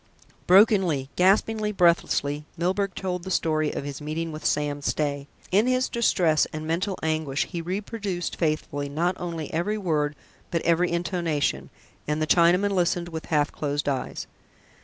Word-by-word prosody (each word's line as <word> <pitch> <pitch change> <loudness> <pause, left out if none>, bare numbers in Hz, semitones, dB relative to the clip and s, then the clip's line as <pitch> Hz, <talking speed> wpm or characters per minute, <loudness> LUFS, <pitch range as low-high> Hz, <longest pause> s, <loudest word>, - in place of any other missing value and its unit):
Brokenly, 185 - +4
gaspingly, 210 +3 +2
breathlessly, 170 -5 +2
Milburgh 190 +3 0
told 180 -2 -3
the 190 - -6
story 155 -4 +1
of - - -4
his 140 0 -6
meeting 160 +2 -3
with 155 0 -8
Sam 145 -1 0
Stay. 145 -1 -1 0.2
In 205 +6 +4
his 255 0 +1
distress 175 -9 +2
and 155 0 -5
mental 180 +5 -1
anguish 155 -3 0
he 170 -3 -5
reproduced 195 0 -3
faithfully 150 -3 -1
not 170 +5 0
only 165 -3 -5
every 175 +7 0
word, 150 -6 0 0.3
but 170 - -1
every 170 +1 +2
intonation, 170 - -1 0.4
and 150 +1 0
the 155 - +1
Chinaman 180 +5 +4
listened 175 -2 0
with 160 -1 -6
half 150 -2 +1
closed 145 -1 -3
eyes. 135 -3 -2
170 Hz, 150 wpm, -25 LUFS, 150-185 Hz, 0.4 s, Brokenly